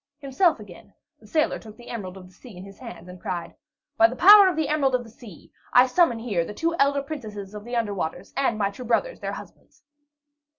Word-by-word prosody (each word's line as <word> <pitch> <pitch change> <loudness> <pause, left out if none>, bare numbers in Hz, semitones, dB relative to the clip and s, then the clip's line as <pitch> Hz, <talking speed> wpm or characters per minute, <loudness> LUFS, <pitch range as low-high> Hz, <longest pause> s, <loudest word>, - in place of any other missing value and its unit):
Himself 295 +2 +1
again, 200 -1 -14 0.2
the 215 - -18
sailor 310 +6 0
took 215 -1 -13
the 240 - -13
Emerald 195 -5 -6
of 185 - -12
the 185 - -21
Sea 230 -4 -14
in 180 - -9
his 195 0 -13
hands, 180 -9 -10
and 180 0 -12
cried, 175 -2 -5 0.4
"By 225 - +7
the 245 - -7
power 405 +5 +9
of 370 - 0
the 315 -1 -1
Emerald 280 -4 +1
of 245 - -2
the 225 - -15
Sea, 215 -6 -15 0.2
I 250 +1 +7
summon 260 -2 +2
here 215 -7 -1
the 210 - -8
two 335 +6 -1
elder 280 0 +2
princesses 215 -9 -8
of 210 -1 -8
the 240 +2 -6
under 225 -3 -1
waters, 170 -5 -5
and 265 -4 0
my 200 -1 0
two 225 +5 -10
brothers, - - -1
their - - -4
husbands!" - - -13
235 Hz, 230 wpm, -24 LUFS, 200-275 Hz, 0.4 s, power